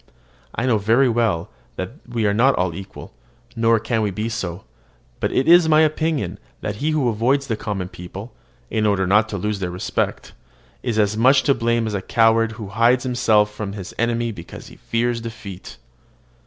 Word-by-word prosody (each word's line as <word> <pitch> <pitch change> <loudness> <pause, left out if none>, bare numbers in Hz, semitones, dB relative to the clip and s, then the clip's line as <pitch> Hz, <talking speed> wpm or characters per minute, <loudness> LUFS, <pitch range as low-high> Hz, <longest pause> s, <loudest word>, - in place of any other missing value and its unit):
I 120 - -1
know 115 -4 +2
very 115 +6 +3
well 110 - 0 0.2
that 95 +2 -4 0.2
we 115 -2 -1
are 100 - +2
not 130 +6 +4
all 90 -1 0
equal, 95 +2 -10 0.4
nor 115 -1 +3
can 110 -2 0
be 110 +2 -2
so; 95 -6 -4 0.6
but - - -1
it 130 - +1
is 170 -1 +7
my 155 0 +6
opinion 155 - 0 0.2
that 105 0 -4
he 150 +7 -1
who 155 -5 +1
avoids 120 +5 +1
the 115 - -2
common 100 -4 -4
people, 95 +5 -9 0.4
in 110 -1 +1
order 100 -2 +2
not 105 +4 +3
to 100 - -3
lose 105 +2 -2
their 90 -2 -2
respect, 90 +1 -3 0.5
is 120 -3 -2
as 105 -1 +2
much 130 +4 +5
to 140 - +4
blame 115 -1 0
as 110 - -3
a 100 - -2
coward 115 +1 +3
who 110 -3 -8
hides 115 +5 +3
himself 110 -5 +2
from 105 -2 -5
his 100 -2 -8
enemy 120 0 0
because 85 -5 -10
he - - -14
fears 115 0 -1
defeat. 110 - -9
110 Hz, 185 wpm, -21 LUFS, 100-120 Hz, 0.6 s, is